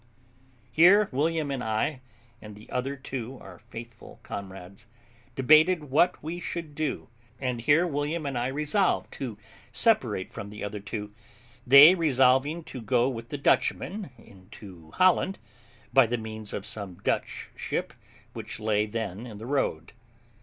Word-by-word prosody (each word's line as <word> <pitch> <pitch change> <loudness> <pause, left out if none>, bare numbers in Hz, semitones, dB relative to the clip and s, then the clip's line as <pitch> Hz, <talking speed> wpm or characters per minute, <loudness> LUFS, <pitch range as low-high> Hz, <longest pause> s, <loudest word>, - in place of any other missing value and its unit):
Here 190 - +6
William 155 +2 0
and 135 -2 -3
I, 110 +5 -1 0.4
and 105 -1 -10
the 105 - -15
other 135 +2 -2
two, 130 -2 -6
our 90 -3 -13
faithful 115 -1 -11
comrades, 95 +1 -9 0.5
debated 155 +2 +4
what 155 +4 +2
we 165 +3 -5
should 165 -2 -5
do; 150 -1 -3 0.3
and 125 -3 -2
here 150 +8 +4
William 150 0 -2
and 140 -2 -3
I 120 +1 0
resolved 150 +8 0
to 120 -6 -6 0.3
separate 125 - +1
from 100 - -7
the 105 0 -8
other 105 0 -4
two, 105 0 -6 0.5
they 140 +6 +10
resolving 145 -1 +2
to 130 - -9
go 125 +2 +2
with 115 -2 -7
the 145 - -4
Dutchman 185 +6 0
into 95 -3 -14
Holland, 185 - +2 0.6
by 135 -3 +6
the 120 +2 -1
means 110 -1 -7
of 100 - -5
some 100 -4 -6
Dutch - - -2
ship - - -3 0.4
which - - -7
lay 105 -1 +1
then 110 0 -5
in 110 -3 -9
the 110 - -9
road. 125 - -2
125 Hz, 145 wpm, -27 LUFS, 110-150 Hz, 0.6 s, they